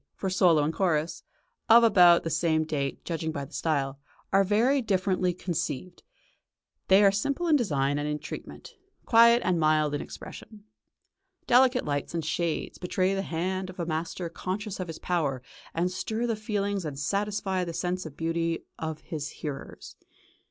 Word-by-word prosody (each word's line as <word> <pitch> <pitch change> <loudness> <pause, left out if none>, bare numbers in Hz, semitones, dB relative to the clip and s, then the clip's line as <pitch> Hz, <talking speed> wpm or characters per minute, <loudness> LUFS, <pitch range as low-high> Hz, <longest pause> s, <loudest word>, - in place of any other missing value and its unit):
for 190 - -3
solo 175 -5 +4
and 155 +2 -1
chorus, 165 -4 0 0.5
of 235 +1 +8
about 180 -6 +6
the 165 - -2
same 160 -1 +1
date, 140 -3 -3
judging 160 -2 -2
by 140 -2 -4
the 140 - -17
style, 140 -4 -1 0.3
are 195 0 +5
very 235 +8 +2
differently 185 -4 +1
conceived: 175 -1 -4 0.9
they 190 +2 +6
are 200 - +6
simple 280 - -1
in 315 - +5
design 145 - +1
and 145 0 -2
in 150 - -1
treatment, 150 - -9 0.3
quiet 235 +1 +6
and 180 -2 +2
mild 155 -1 +2
in 145 - -2
expression. 215 -2 -10 0.8
Delicate 255 +1 +4
lights 145 +3 -3
and 165 -2 -2
shades 165 0 -2
betray 185 +1 0
the 195 - -1
hand 185 +2 -3
of 185 - -11
a 170 - -1
master 165 +2 -3
conscious 190 +4 -5
of 185 - -3
his 165 - -7
power 145 -8 -1 0.3
to 175 +2 +2
stir 220 +5 -3
the 230 -2 0
feelings 205 -2 -2
and 150 -3 -5
satisfy 195 +3 -1
the 170 - -4
sense 180 +2 -2
of 155 -3 -10
beauty 165 0 -1 0.2
of 160 -1 -4
his 150 -2 -5
hearers. 145 -3 -8
175 Hz, 165 wpm, -27 LUFS, 155-200 Hz, 0.9 s, of